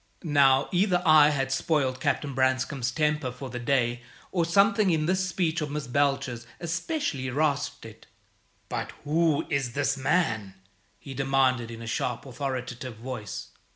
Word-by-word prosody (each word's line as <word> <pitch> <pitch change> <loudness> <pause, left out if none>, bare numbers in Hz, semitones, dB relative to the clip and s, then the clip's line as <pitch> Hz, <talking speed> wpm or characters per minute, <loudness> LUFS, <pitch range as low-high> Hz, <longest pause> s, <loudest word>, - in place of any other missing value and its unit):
Now, 140 -4 +4
either 180 0 +3
I 155 -2 +7
had 135 -2 -1
spoiled 135 -3 0
Captain 140 +2 -1
Branscome's 130 0 +1
temper 150 -4 0
for 125 +1 -8
the 125 - -4
day, 120 -1 +1 0.3
or 175 -3 +1
something 200 +4 +4
in 160 -3 +1
this 185 +2 +1
speech 170 -3 0
of 150 - -2
Miss 150 0 -3
Belcher's 125 -3 0
especially 170 - -2
rasped 145 +1 -1
it. - - -13 0.6
"But - - -4
who 155 0 +2
is 135 -4 0
this 145 0 0
man?" 115 - 0 0.4
he 135 - -9
demanded, 130 -3 +1
in 115 0 -8
a - - -7
sharp, 120 +2 -2
authoritative 130 -2 -5
voice. 115 -3 -6
140 Hz, 150 wpm, -27 LUFS, 125-155 Hz, 0.6 s, I